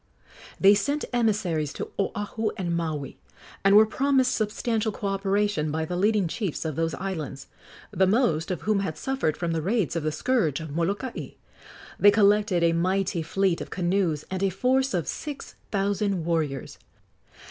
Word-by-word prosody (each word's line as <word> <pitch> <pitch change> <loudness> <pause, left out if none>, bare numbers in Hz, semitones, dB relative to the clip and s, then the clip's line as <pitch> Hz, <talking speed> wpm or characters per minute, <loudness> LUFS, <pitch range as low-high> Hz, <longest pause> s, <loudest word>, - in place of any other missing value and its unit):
They 195 +1 +7
sent 280 +9 0
emissaries 200 -11 +1
to - - -6
Oahu 205 +2 -1
and 175 -3 -1
Maui, 155 -5 -3 0.4
and 195 +1 +5
were 215 +1 +8
promised 265 +2 +2
substantial 220 +1 -1
co 205 - -7
operation 195 -4 0
by 160 +1 -1
the 180 - -4
leading 205 0 +2
chiefs 185 -3 -3
of 155 -3 -2
those 165 0 -1
islands, 160 -8 -5 0.5
the 190 - +2
most 185 -7 +2
of 180 - -3
whom 215 -1 +1
had 175 -6 -3
suffered 265 - -1
from 170 -1 -2
the 165 -1 -1
raids 195 -1 0
of 165 - 0
the 155 0 -1
scourge 165 - 0
of 160 -2 -7
Molokai. 200 +9 -2 0.7
They 205 - +7
collected 205 -3 +3
a 165 0 +4
mighty 185 +1 0
fleet 185 +2 0
of - - -6
canoes 175 -4 0
and 190 0 -2
a 195 - +2
force 255 +7 +1
of 170 -4 -1
six 295 -3 -6 0.2
thousand 200 -3 0
warriors. 155 -6 -2
195 Hz, 165 wpm, -26 LUFS, 165-210 Hz, 0.7 s, were